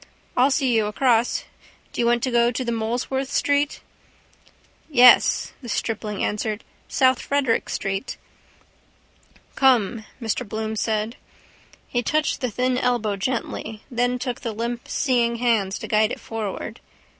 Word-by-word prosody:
I'll 255 +3 +4
see 265 -3 +2
you 220 -2 +2
across. 235 +1 +2 0.5
Do - - -1
you 235 - +2
want 240 0 +2
to 255 - 0
go 235 0 +4
to 240 0 -2
Molesworth 240 +4 -2
street? 285 0 +1 1.1
—Yes, 250 -4 +6
the 240 - -8
stripling 210 -2 -2
answered. 210 +1 -2 0.2
South 260 -3 +3
Frederick 280 -5 0
street. 195 +4 -3 1.4
—Come, 235 -5 +3
Mr 225 0 -1
Bloom 220 0 -3
said. 220 +1 -1 0.7
He 245 - 0
touched 305 +5 0
the 250 - 0
thin 250 +3 0
elbow 240 -5 0
gently: 220 0 -3
then 245 +1 +1
took 250 -1 -4
the 230 - -3
limp 235 +2 -4
seeing 240 -4 +1
hand 225 -5 +1
to - - -5
guide 215 0 +3
it - - -4
forward. 220 -3 -5
235 Hz, 135 wpm, -23 LUFS, 220-255 Hz, 1.4 s, Yes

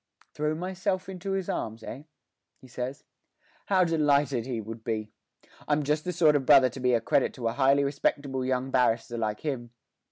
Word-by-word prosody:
'Throw 150 +1 -1
myself 185 +2 -2
into 190 +1 -4
his 190 -2 -2
arms, 110 0 -4
eh?' 135 - -7 0.6
he 130 - -15
says. 130 +3 -5 0.6
'How 190 -2 +4
delighted 145 -6 +2
he 125 -3 -2
would 110 +1 -8
be! 110 -2 -3 0.6
I'm 150 0 +1
just 150 +3 0
the 180 - -1
sort 160 -3 +4
of 140 - +1
brother 135 -2 +6
to 130 - -9
be 125 -1 +3
a - - +2
credit 130 - +1
to 120 -3 -3
a 115 - -1
highly 140 +1 +3
respectable 140 -1 -1
young 130 0 -1
barrister 120 -2 +1
like 105 -1 -2
him. 130 -6 -3
135 Hz, 185 wpm, -28 LUFS, 120-155 Hz, 0.6 s, brother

